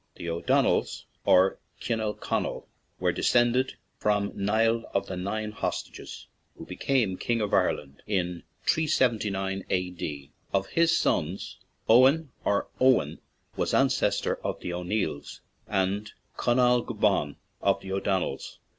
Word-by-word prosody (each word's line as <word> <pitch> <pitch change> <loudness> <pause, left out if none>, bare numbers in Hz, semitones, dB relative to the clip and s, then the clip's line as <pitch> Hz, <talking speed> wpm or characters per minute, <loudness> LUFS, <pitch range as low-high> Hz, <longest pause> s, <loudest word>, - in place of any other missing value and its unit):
The 85 - -5
O'Donnells, 85 - +1 0.2
or 95 +1 +4 0.2
Cinel 110 -3 -1
Conall, - - -2 0.3
were - - +2
descend 120 0 +3
ed 130 +1 +1 0.3
from 105 -1 +1
Niall 115 +3 +1
of 100 - +1
the 95 - -5
Nine 105 +4 -3
Hostages, 105 - -5 0.3
who - - -9
became 115 -9 0
king 120 -1 0
of 105 -2 -2
Ireland 70 +1 0
in 90 -4 -1 0.2
379 105 -10 +1
A.D. 85 -6 -3 0.2
Of 95 0 0
his 170 0 +3
sons, 85 +4 -1 0.3
Eoghan, 135 +7 +5
or 100 - +1
Owen, 130 -1 +3 0.4
was - - 0
ancestor - - +2
of - - -3
the 90 - -4
O'Neills, 90 -4 -3 0.3
and 100 +2 -1 0.2
Conall 125 0 +3
Gulban 105 -10 +1 0.3
of - - +2
the 95 - -7
O'Donnells. 95 -1 -2
105 Hz, 125 wpm, -27 LUFS, 95-120 Hz, 0.4 s, Eoghan